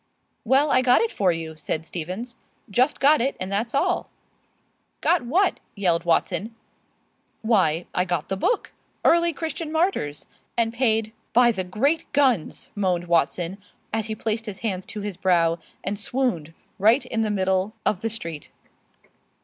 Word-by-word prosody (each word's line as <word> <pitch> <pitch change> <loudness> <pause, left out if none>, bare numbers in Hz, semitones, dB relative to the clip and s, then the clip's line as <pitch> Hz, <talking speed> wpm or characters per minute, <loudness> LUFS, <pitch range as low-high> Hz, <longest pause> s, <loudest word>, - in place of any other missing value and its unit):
"Well, 270 +5 +3
I 255 - +5
got 250 -1 +5
it 460 - 0
for 190 -3 +2
you," 165 -1 -5
said 155 +1 -3
Stevens, 185 +9 -5 0.4
"just 255 +8 +2
got 295 +1 +5
it, 270 +3 -1
and 185 +1 -4
that's 225 +5 -1
all." 360 +5 +1 0.9
"Got 350 - +3
what?" 370 +9 +2 0.2
yelled 175 -4 +1
Watson. 200 +6 0 0.9
"Why, 185 -7 +2
I 180 - +2
got 175 -4 -2
the 195 - -1
book, 420 - 0 0.3
'Early 340 0 +5
Christian 320 0 -4
Martyrs,' 315 - 0 0.3
and 230 -1 +1
paid 225 -3 +1
" - - -44
"By 240 -1 +6
the 190 -4 -2
great 275 - 0
guns!" 260 - +1
moaned 180 -4 0
Watson, 170 +2 0 0.3
as 220 -1 -1
he 220 - -3
placed 220 +1 -2
his 195 -2 -6
hands 190 -4 -2
to 210 - -6
his 200 -3 -5
brow 170 -2 +2 0.2
and 200 +2 -2
swooned 205 - -1 0.2
right 225 +7 +4
in 225 - -1
the 220 - 0
middle 190 0 0
of 190 - +1
the 225 - -1
street. 170 -9 -7
215 Hz, 160 wpm, -24 LUFS, 180-255 Hz, 0.9 s, By